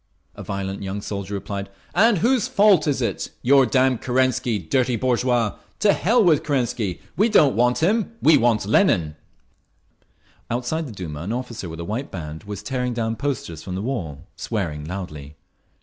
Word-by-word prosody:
A - - -10
violent 100 0 -4
young 100 +1 -4
soldier 100 -1 -5
replied. 100 0 -5 0.2
"And 215 +4 +4
whose 240 +4 +2
fault 200 -6 +4
is 135 -3 0
it? - - -2
Your 135 0 +5
damn 130 +1 +2
Kerensky, 130 -2 +1
dirty 120 +8 0
bourgeois! 120 -2 0 0.2
To 205 -2 +4
hell 230 +4 +3
with 160 -6 +4
Kerensky! 120 - -1
We 215 +5 +3
don't 150 - +4
want 125 +5 +2
him! 220 +5 +1
We 160 - +6
want 115 -6 +2
Lenin…." 95 - +2 1.3
Outside 130 +7 -2
the - - -8
Duma 85 -8 -6
an 95 +5 -4
officer 120 -7 -5
with 80 +1 -8
a 85 - -5
white 115 +8 -3
arm 85 - -4
band 75 +4 -8
was 105 -1 -7
tearing 125 +1 -2
down 115 -1 -1
posters 115 - -4
from 90 +1 -6
the 95 - -3
wall, 90 - -4
swearing 80 -10 -3
loudly. 75 -5 -7
120 Hz, 170 wpm, -22 LUFS, 95-135 Hz, 1.3 s, We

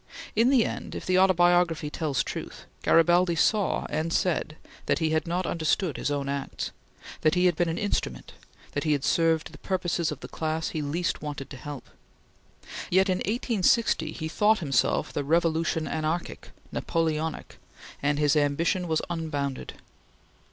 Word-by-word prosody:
In 230 +4 +4
the 260 -5 +4
end, - - -5
if - - -6
the 185 0 +3
"Autobiography" 175 -4 +3
tells 150 -5 -1
truth, - - -7 0.2
Garibaldi 175 +1 +4
saw 205 +3 +2
and 160 +1 -1
said 165 -3 0 0.3
that - - +2
he 160 -1 0
had 155 +1 0
not 175 +2 -1
understood 165 0 0
his - - -1
own 140 -1 -2
acts; 140 -1 -3 0.5
that 155 +2 +3
he 180 0 +3
had 175 -2 +4
been 175 +1 +1
an 165 - -2
instrument; 180 - -2 0.4
that 145 - -2
he 155 -2 +2
had 140 -2 -1
served 165 -1 +2
the - - -13
purposes 175 -3 -1
of - - -7
the - - -7
class 160 0 -2
he 155 - -3
least 160 +4 -2
wanted 145 -2 -6
to - - -6
help; 145 0 -8 1.0
yet 190 +2 +3
in 185 0 +1
1860 225 -6 +1
he 160 - -5
thought 210 +6 +3
himself 145 -8 0
the 145 - -1
revolution 165 +1 +1
anarchic, 160 +2 -3 0.2
Napoleonic, 160 -1 -2 0.4
and 145 0 +1
his 150 0 +3
ambition 165 +5 +1
was 160 -1 0
unbounded. 145 -5 -3
165 Hz, 160 wpm, -27 LUFS, 150-180 Hz, 1.0 s, In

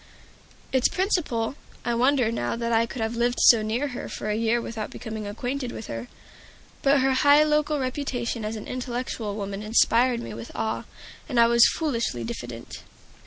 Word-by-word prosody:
Its 260 -1 +4
Principal 330 - 0 0.3
I 240 - +1
wonder 250 -1 +3
now 120 - -2
that 235 0 -2
I 230 +1 +3
could 235 -2 -4
have 220 +1 -2
lived 240 +1 0
so 230 -2 +7
near 235 +7 -1
her 250 - -6
for 210 - -4
a - - 0
year 230 +1 +1
without 230 -2 -5
becoming 220 -2 -6
acquainted 245 +4 -3
with 220 - -7
her, 115 +1 -6 0.7
but 275 0 +4
her 265 0 +3
high 285 +3 +6
local 300 0 +1
reputation 255 -3 -2
as 215 +1 -3
an 215 - -7
intellectual 245 -4 -4
woman 200 -1 -4
inspired 235 +3 +3
me 115 - -6
with 115 +1 -8
awe, 220 - -2 0.4
and 250 -4 +1
I 235 - +8
was 235 0 +6
foolishly 235 - -1
diffident. 120 0 -7
235 Hz, 175 wpm, -25 LUFS, 220-260 Hz, 0.7 s, I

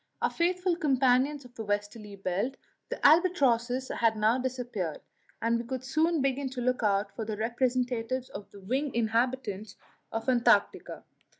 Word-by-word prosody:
Our - - 0
faithful 360 +1 +1
companions 270 -1 +2
of 245 - -15
the 225 - -6
westerly 205 0 -3
belt 200 +7 -2 0.3
the - - -4
albatrosses 265 -7 +3
had 225 -1 +1
now 220 +4 +3
disappeared, 245 - -3 0.4
and 230 0 +2
we - - -3
could 260 +1 -5
soon 315 +3 +1
begin 270 0 0
to 255 -1 -6
look 250 +1 0
out 200 -1 0
for 225 - -3
the 215 0 -4
first - - -5
representatives 250 +1 -1
of 200 0 -9
the 200 - -14
winged 260 +7 -2
inhabitants 230 -2 -1 0.4
of 225 +2 -4
Antarctica. 245 -2 +2
245 Hz, 160 wpm, -29 LUFS, 220-265 Hz, 0.4 s, albatrosses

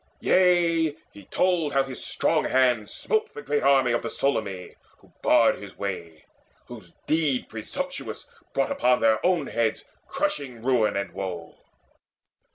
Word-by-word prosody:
Yea, 170 -4 +3 0.2
he 100 -2 -13
told 170 - 0
how 135 0 +3
his 135 -2 -7
strong - - +1
hands 125 -5 +2
Smote 440 0 -1
the - - -6
great 145 -7 0
army 135 -2 +4
of 120 - +1
the 115 - -4
Solymi 100 -10 -2 0.2
Who - - -24
barred - - +4
his - - -11
way, 85 -5 -6 0.4
whose 105 -8 -12
deed 155 -5 0
presumptuous 275 - -5 0.2
brought - - 0
Upon 125 - +2
their 110 -1 +3
own 175 -5 +2
heads 115 -3 -1 0.2
crushing 140 - -3
ruin 120 -6 +2
and 100 - -3
woe. 90 -3 -6
130 Hz, 145 wpm, -25 LUFS, 110-165 Hz, 0.4 s, army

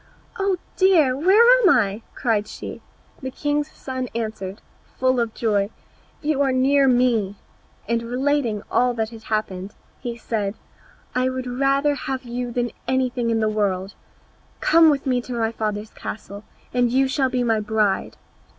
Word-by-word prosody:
"Oh 390 -1 +1 0.2
dear! 335 -9 +4
where 380 - +5 0.2
am 400 - +6
I?" 215 - +2
cried 215 -3 0
she. - - -8 0.4
The 260 - -4
king's 290 +2 -1
son 260 -3 -5
answered, 215 -4 -4 0.4
full 255 -1 +2
of 230 -2 -1
joy, 205 -3 +1 0.5
"You 295 -2 +1
are 275 -1 +3
near 270 +2 +3
me," 240 -6 +2 0.5
and, 230 +1 +1
relating 245 -2 0
all 245 0 +2
that 220 -1 -2
had 225 -1 -12
happened, 200 -3 -3 0.2
he 240 -2 -5
said, 215 -3 -2 0.6
"I 255 +1 +1
would 260 0 -4
rather 275 +3 +2
have 265 -2 -4
you 245 0 -4
than 240 0 -1 0.2
anything 255 -2 0
in 225 -1 +1
the 215 - +2
world; 200 -3 -1 0.7
come 325 0 +6
with 285 -1 0
me 250 -2 +1
to 250 - -7
my 225 -1 0
father's 215 -1 -3
castle 205 -1 -8 0.3
and 245 -1 +2
you 265 +2 +3
shall 265 0 +1
be 250 -1 0
my 225 -2 +2
bride." 210 -2 0
245 Hz, 160 wpm, -22 LUFS, 220-265 Hz, 0.7 s, am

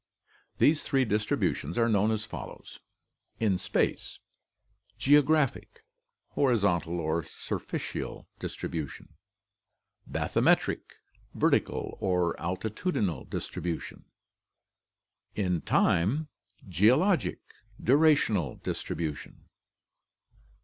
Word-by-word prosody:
These 155 +1 +4
three 135 -2 +1
distributions 105 - -1
are 115 -1 +3
known 105 -1 +3
as 110 -1 -1
follows: 110 - -9 0.6
In 100 -5 +2
space: - - -1 0.8
Geographic. 145 0 +2 0.5
Horizontal 95 - +1
or 80 +1 0
surficial 70 - -5
distribution. 80 -4 -5 1.0
Bathymetric. - - +2 0.5
Vertical - - 0
or 90 -2 +1
altitudinal 95 - -2
distribution. 85 -1 -5 1.3
In 90 -5 0
time: 130 - +2 0.4
Geologic. 125 - +3 0.4
Durational 130 - +3
distribution. 75 -3 -4
105 Hz, 70 wpm, -29 LUFS, 85-135 Hz, 1.3 s, These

